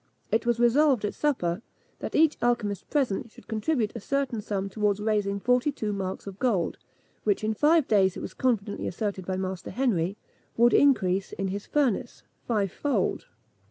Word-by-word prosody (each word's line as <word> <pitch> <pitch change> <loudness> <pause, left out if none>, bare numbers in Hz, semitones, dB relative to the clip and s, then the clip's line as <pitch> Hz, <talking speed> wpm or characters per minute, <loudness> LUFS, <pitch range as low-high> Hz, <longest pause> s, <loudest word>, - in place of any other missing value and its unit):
It 225 +1 +1
was 235 -1 +2
resolved, 245 -1 +4
at 210 - -2
supper, 210 - 0 0.4
that - - -5
each 315 -1 +5
alchymist 230 -5 0
present 240 -6 0
should - - -17
contribute 220 0 0
a - - -4
certain 270 -1 -1
sum 195 -1 -2
towards 205 0 0
raising 210 -2 0
forty 250 +6 +2
two 215 -6 -3
marks 190 -1 -4
of 195 -1 -8
gold, 220 -10 0 0.4
which, 205 0 +1
in 215 +1 +1
five 300 +5 +3
days, 190 -3 +3
it - - -6
was - - -6
confidently 220 -5 -1
asserted 195 -1 -3
by 185 -1 -1
Master 185 -1 -4
Henry, 205 -7 0 0.4
would 240 +1 +5
increase, 195 -9 +3
in 195 0 -2
his 200 +2 -5
furnace, 275 -8 0 0.2
fivefold. 225 +5 0
215 Hz, 165 wpm, -27 LUFS, 195-250 Hz, 0.4 s, each